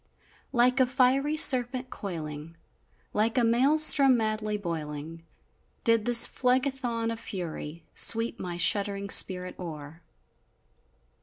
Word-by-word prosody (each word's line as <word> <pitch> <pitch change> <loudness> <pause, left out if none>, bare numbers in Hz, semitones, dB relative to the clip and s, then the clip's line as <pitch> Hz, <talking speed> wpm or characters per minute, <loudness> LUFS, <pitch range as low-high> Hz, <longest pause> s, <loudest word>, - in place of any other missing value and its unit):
Like 250 +1 +1
a 260 - +2
fiery 270 +4 0
serpent 255 -3 +2
coiling, 160 -4 -9 0.6
Like 220 +3 -2
a 245 - +1
Maelstrom 270 +2 +4
madly 215 -1 -4
boiling, 165 -3 -8 0.6
Did 230 -2 +1
this 240 -1 +8
Phlegethon 250 -3 -2
of 225 - -10
fury 170 -5 -8
Sweep 230 +1 +3
my 175 -1 -7
shuddering 200 +2 -1
spirit 180 -1 +1
o'er! 160 -2 -10
225 Hz, 105 wpm, -25 LUFS, 175-250 Hz, 0.6 s, this